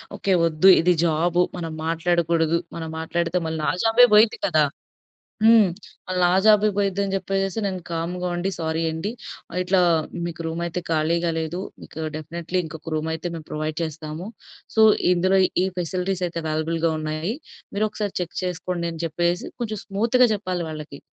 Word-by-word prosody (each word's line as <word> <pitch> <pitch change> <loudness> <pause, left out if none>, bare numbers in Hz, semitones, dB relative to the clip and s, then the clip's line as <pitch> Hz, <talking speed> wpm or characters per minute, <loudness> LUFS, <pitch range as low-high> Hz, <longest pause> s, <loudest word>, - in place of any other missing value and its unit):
Okay, 195 - -1
వద్దు 165 +4 +4
ఇది 180 +2 +4
job. 170 +2 +2 0.2
మనం 165 -2 -4
మాట్లాడకూడదు. 165 0 +1 0.2
మనం 160 -1 -5
మాట్లాడితే 170 +2 -1
మళ్ళీ 160 0 -3
నా - - +2
జాబే 225 +2 +7
పోయిద్ది 215 +1 +6
కదా! 155 -5 +3 0.8
హ్మ్. 225 -2 +7 0.4
మళ్లీ 185 0 -1
నా 175 - +4 0.2
జాబే 210 0 +6
పోయిద్ది 200 -1 0
అని 195 0 -2
చెప్పేసేసి 195 +1 -2
నేను 185 -2 -3
కామ్‌గా 175 +2 -2
ఉండి, 185 +3 -1
సారీ 160 0 -1
అండి. 160 +6 -3 0.5
ఇట్లా 185 0 +2 0.5
మీకు 170 0 -6
రూమ్ 165 +1 -3
అయితే 170 +1 -3
ఖాళీగా 165 +2 +1
లేదు. 160 +3 -3 0.2
మీకు 160 - -9 0.2
డెఫినిట్‌‌లీ 170 +3 -4
ఇంకొక 160 +1 -8
రూమ్ 155 +1 -1
అయితే 160 +2 -6
మేము 160 -2 -8
ప్రొవైడ్ 155 0 -3
చేస్తాము. 160 +2 -5 0.5
సో, 220 - +5 0.3
ఇందులో 185 +2 +3 0.3
ఈ - - +1
ఫెసిలిటీస్ 180 +1 -2
అయితే 170 0 -5
అవైలబుల్‌గా 160 +1 0
ఉన్నాయి. 155 +6 -2 0.4
మీరొకసారి 210 -1 -2
చెక్ 175 - -7
చేసుకోండి, 180 -1 -3
అని 160 - -9
చెప్పేసి 175 +2 -1
కొంచెం 215 -3 -3
స్మూత్‌గా 230 +5 +3
చెప్పాలి 180 -3 -3
వాళ్ళకి. 150 -2 -8
170 Hz, 155 wpm, -23 LUFS, 160-190 Hz, 0.8 s, జాబే